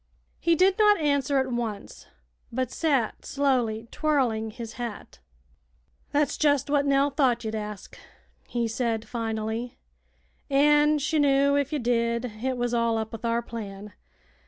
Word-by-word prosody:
He 335 -1 +3
did 375 +4 +3
not 420 -1 +6
answer 285 -2 +1
at 265 -1 0
once, 225 -4 -5 0.4
but 255 +1 -2
sat 275 -9 0
slowly 245 -6 0
twirling 250 -8 0
his 225 +1 -8
hat. 235 -2 -7 0.9
"That's 290 0 +1
jet' 285 -2 +2
what 285 -1 +2
Nell 280 +1 +3
thought 255 -5 +1
ye'd 220 - -3
ask," 210 -2 -6 0.5
he 235 -1 -1
said, 225 -1 -2
finally, 225 +1 -3 0.7
"an' 295 +2 +4
she 300 +2 0
knew 280 0 +3
if 285 -1 0
ye 305 - 0
did 235 -1 0 0.2
it 260 -1 -1
was 245 0 -1
all 230 -1 +1
up 220 0 -3
with 225 0 -8
our 235 0 0
plan. 210 -3 -8
245 Hz, 145 wpm, -26 LUFS, 225-285 Hz, 0.9 s, not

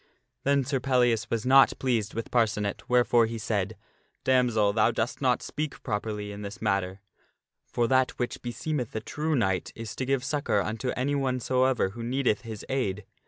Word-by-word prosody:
Then 140 0 +3
Sir 135 +1 -1
Pellias 125 -4 +2
was 115 0 -1
not 135 +1 +6
pleased 115 -5 -1
with 115 - -4
Parcenet, 105 -4 0
wherefore 120 -2 +4
he 115 0 -5
said, 110 - -2 0.2
" - - -43
Damsel, 120 -6 +3
thou 110 0 +4
dost - - -2
not - - +2
speak 150 +1 -5
properly 105 0 -3
in 100 0 -8
this 100 0 -7
matter, 100 -2 -1 0.7
for 120 -1 0
that 130 0 +3
which 125 - -3
be 120 - -4
seemeth 130 -2 -3
a - - 0
true 155 +6 -2
knight 95 -7 0
is 115 0 -7
to 130 - -2
give 135 -2 +1
succor 140 -7 0
unto 110 +5 -2
anyone 130 -1 0
soever 130 -3 +2
who 115 +4 -9
needeth 125 -2 0
his 110 -4 -8
aid. 105 -7 -2
120 Hz, 180 wpm, -27 LUFS, 105-130 Hz, 0.7 s, not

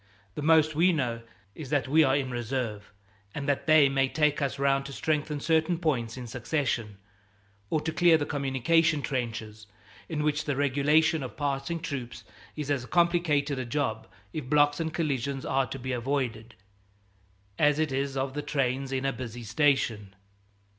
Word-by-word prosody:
The 150 - -5
most 155 0 +4
we 170 +5 +4
know 125 -8 -1 0.3
is 145 +2 -8
that 145 -3 0
we 155 +4 +5
are 135 -2 +3
in 135 -2 -1
reserve, 120 -3 -3 0.4
and 140 - -4
that 140 +1 0
they 155 -2 +7
may 135 -1 +1
take 150 -1 +1
us 140 0 -1
round 135 0 +1
to 140 - -8
strengthen 150 0 -1
certain 160 +3 +1
points 130 -9 -1
in 125 - -6
succession, 120 -3 -2 0.7
or 155 - 0
to 160 - -2
clear 170 0 +5
the 145 - -2
communication 145 +3 +1
trenches, 110 -5 -4 0.4
in 155 -3 -2
which 150 0 0
the 145 - -1
regulation 145 +3 +2
of 130 - -7
passing 145 +3 -2
troops 140 -7 -6 0.3
is 150 -2 -3
as 130 -3 -1
complicated 170 -5 +2
a - - -2
job, 120 -3 -2 0.3
if 135 -5 -5
blocks 145 0 +3
and 160 -1 -2
collisions 140 -4 -2
are 135 -1 +1
to 135 - -6
be 130 0 -5
avoided, 120 -3 -2 1.0
as 150 -1 +4
it 155 -2 0
is 135 +1 -2
of 135 0 -2
the 150 - -3
trains 135 -2 -1
in 135 0 -2
a 135 - +1
busy 120 -1 -7
station. 115 -5 +1
140 Hz, 170 wpm, -28 LUFS, 130-150 Hz, 1.0 s, they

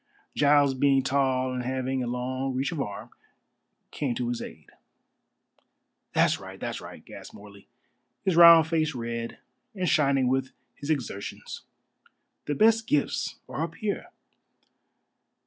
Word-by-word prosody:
Giles 145 -1 +4
being 135 0 +3
tall 130 -1 +1
and 125 - -2
having 130 +1 -2
a 125 - -3
long 130 +2 -3
reach 135 +5 -1
of 160 -5 -3
arm, 100 -5 -6 0.8
came 135 -5 -2
to 120 0 -2
his 120 - -3
aid. - - -10 1.4
"That's - - +3
right, - - -10
that's - - -4
right," - - -11
gasped - - -11
Morley, 100 -1 -14 0.6
his 190 - +2
round 170 -1 +9
face 160 -2 0
red 115 -1 -4 0.4
and 185 -2 -1
shining 140 -5 +3
with 130 +1 -1 0.2
his 145 - -9
exertions, 125 -9 -4 0.8
"the 145 - -2
best 225 +5 +4
gifts 145 -1 0
are 135 - -5
up 165 0 -3
here." 205 +3 -3
135 Hz, 135 wpm, -27 LUFS, 125-150 Hz, 1.4 s, round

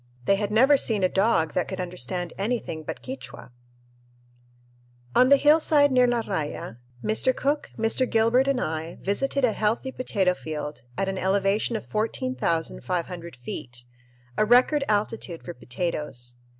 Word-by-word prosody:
They 195 - +3
had 205 0 -2
never 260 +7 +5
seen 215 -6 0
a 185 - +4
dog 190 -6 +2
that 180 - 0
could 190 - -5
understand 180 0 -4
anything 205 -6 -2
but 155 - -7
Quichua! 265 - -8 1.6
On 255 - +6
the 280 - +8
hillside 295 0 +4
near 250 -1 +5
La 240 -1 +1
Raya, 150 - -4 0.3
Mr. 220 +4 +1
Cook, 290 +2 -1
Mr. 225 +3 +1
Gilbert, 230 +4 +3
and 275 -2 +1
I 160 -3 -4
visited 270 +7 0
a 225 - +1
healthy 220 +6 -1
potato 195 -8 +1
field 150 -3 -6 0.2
at 195 - 0
an 190 -1 -2
elevation 200 +4 +1
of 220 - -4
14,500 180 - -2
feet, 120 -1 -7 0.5
a - - +5
record 250 +6 +4
altitude 205 -4 -1
for 175 - -7
potatoes. 125 -2 -3
205 Hz, 145 wpm, -25 LUFS, 170-250 Hz, 1.6 s, the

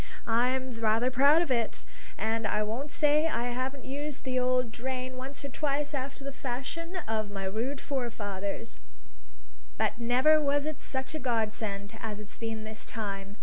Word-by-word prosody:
I'm 250 +3 +2
rather 225 +3 +3
proud 285 +6 +6
of 315 - -3
it. 235 -3 +1 0.3
And 220 +1 +1
I 215 - +2
won't 235 +8 -2
say 300 +2 +4
I 245 -6 0
haven't 260 +2 -3
used 285 +2 -4
the 255 -1 +1
old 250 -1 +2
drain 255 +2 -3
once 270 +2 -6
or - - -3
twice 290 +1 0
after 275 0 -3
the 275 0 -4
fashion 275 +8 -3
of 215 -1 0
my 195 -1 -4
rude 235 +8 -1
forefathers; 220 -5 -3 1.0
but - - +1
never 255 +6 +5
was 285 0 +2
it 310 -2 -3
such 265 +3 -2
a 310 - -2
godsend 220 -3 -1
as 210 -2 -3
it's 210 -1 -10
been 225 -1 -3
this 220 0 -6
time. 200 -2 -4
255 Hz, 165 wpm, -30 LUFS, 220-275 Hz, 1.0 s, proud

